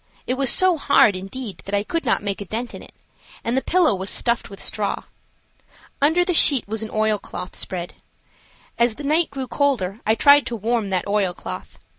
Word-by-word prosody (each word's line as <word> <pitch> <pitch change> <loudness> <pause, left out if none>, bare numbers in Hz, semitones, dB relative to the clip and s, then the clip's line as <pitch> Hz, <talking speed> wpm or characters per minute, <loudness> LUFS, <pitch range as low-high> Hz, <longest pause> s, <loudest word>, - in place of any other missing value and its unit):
It 250 - -1
was 265 0 +2
so 370 +2 +6
hard, 280 -8 +4
indeed, 195 +2 -7
that 200 - -2
I 200 - 0
could 330 +9 -3
not - - 0
make 200 -1 -3
a - - -5
dent 230 +5 -5
in - - -9
it; - - -16 0.5
and 235 - -1
the 265 - +1
pillow 355 - +2
was 190 +1 -3
stuffed 235 -1 0
with 195 - -11
straw. 205 -2 -2 1.0
Under 320 +5 +3
the 360 - 0
sheet 280 -8 +5
was 220 +1 -3
an 220 - -5
oilcloth 215 -4 -3
spread. 175 -2 -5 0.9
As 235 -2 +2
the 295 - -9
night 310 +4 +1
grew 270 -1 -5
colder 240 -9 -1
I 220 - +2
tried 285 +3 +5
to 240 - -3
warm 225 -1 -1
that 185 -2 -1
oilcloth. 190 - -3
225 Hz, 195 wpm, -21 LUFS, 200-280 Hz, 1.0 s, so